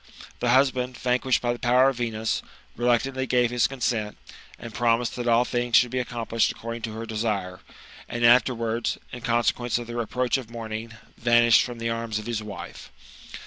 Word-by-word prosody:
The 120 - 0
husband, 130 -1 +2
vanquished 125 0 +1
by 120 0 +1
the 120 - -8
power 125 +2 +4
of 135 - -4
Venus, 110 -2 -2 0.3
reluctantly 130 +2 0
gave 125 -1 +2
his 120 -2 +2
consent, 115 -5 -2 0.4
and 115 -1 -9
promised 115 +1 +1
that 120 -1 -4
all 120 +1 +4
things 120 -1 -1
should 125 -1 +5
be 130 -1 0
accom 120 -1 -6
plished 115 -1 +2
according 115 +1 -6
to 110 -1 -5
her 115 +1 -6
desire; 105 -5 -2 0.5
and 120 0 0
afterwards, 115 -1 +3
in 120 - -8
consequence 120 +1 +1
of 120 - -5
the 120 +1 -5
approach 125 +3 0
of 125 -4 -8
morning, 110 -1 -6 0.3
vanished 120 -1 +5
from 120 -1 -4
the 115 0 -2
arms 115 -2 -3
of 105 - -6
his 115 -2 -2
wife. 100 -5 -9
120 Hz, 185 wpm, -25 LUFS, 115-125 Hz, 0.5 s, should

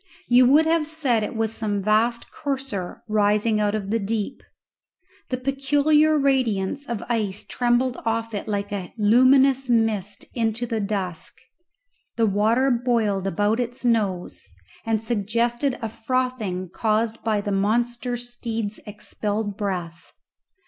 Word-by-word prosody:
You 245 +1 +6
would 300 +5 +5
have 320 -1 +2
said 285 -8 0
it 210 - -4
was 225 0 -1
some 205 -3 -2
vast 225 +3 +1
courser 265 - -4
rising 210 +1 +2
out 210 0 +1
of 200 -2 -4
the 230 - +1
deep. 210 0 -3 0.9
The 255 - -1
peculiar 290 +4 +2
radiance 265 -3 0
of 235 -3 -3
ice 210 -4 -1
trembled 245 +1 +1
off 225 0 -1
it 205 - -4
like 200 -1 -2
a 190 -3 -5
luminous 260 +4 +4
mist 220 -4 0
into 230 0 0
the 225 -2 -2
dusk. 195 -5 -3 0.8
The 230 - +2
water 220 +6 +2
boiled 230 -6 +1
about 205 +5 +1
its 245 +1 -4
nose, 205 -7 0 0.5
and 220 -1 0
suggested 235 +4 0
a 225 - -1
frothing 225 -6 -2
caused 220 +1 0
by 215 -2 +1
the 205 0 -3
monster 235 +4 0
steed's 230 -3 -4
expelled 210 0 -4
breath. 180 -5 -5
225 Hz, 135 wpm, -23 LUFS, 205-245 Hz, 0.9 s, You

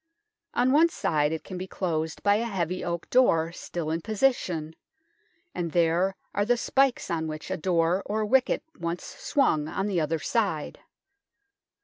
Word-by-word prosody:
On 250 +1 +3
one 320 +4 +5
side 150 - 0
it 160 - -3
can 185 -2 -7
be 185 - -5
closed 160 -4 -3
by 205 0 +4
a 230 - -1
heavy 185 -5 -2
oak 170 -1 -3
door 165 -11 +4
still 170 -2 -5
in 165 +1 -1
position, 190 -8 0 0.8
and 170 -3 -3
there 175 +3 +2 0.2
are 205 - +1
the 240 +3 +2
spikes 265 -3 +1
on 160 -1 -1
which 155 0 -6
a - - +1
door 170 +2 +1
or 215 +1 0
wicket 255 +4 +2 0.2
once 170 +1 -3
swung 275 - 0
on 195 - -2
the 190 -5 0
other 155 +1 0
side. 175 -3 -1
180 Hz, 160 wpm, -27 LUFS, 160-220 Hz, 0.8 s, one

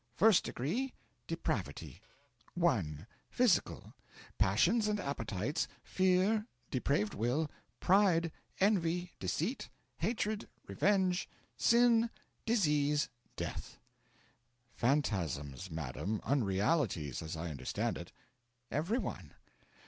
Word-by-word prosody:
FIRST 220 -3 +6
DEGREE: 220 - -2 0.3
Depravity. 95 - -3 0.5
1. 100 - +1 0.2
Physical 240 -8 +1 0.5
Passions 190 - +3
and 210 -1 0
appetites, 120 - -2 0.2
fear, 190 +4 +2 0.2
depraved 125 -5 +1
will, 130 +8 0 0.3
pride, 180 -4 +4 0.3
envy, 180 -3 +2
deceit, 160 - -2 0.3
hatred, 220 -2 -1 0.2
revenge, 190 -3 +1 0.3
sin, 235 -1 +4 0.4
disease, 150 -9 +2 0.3
death.' - - -5 1.0
'Phantasms, 95 - 0
madam 80 +7 -3
unrealities, 105 - +1
as 80 0 -5
I 80 +1 -4
understand 70 - -2
it.' - - -9 0.6
'Every 170 - 0
one. - - -5
150 Hz, 85 wpm, -34 LUFS, -, 1.0 s, FIRST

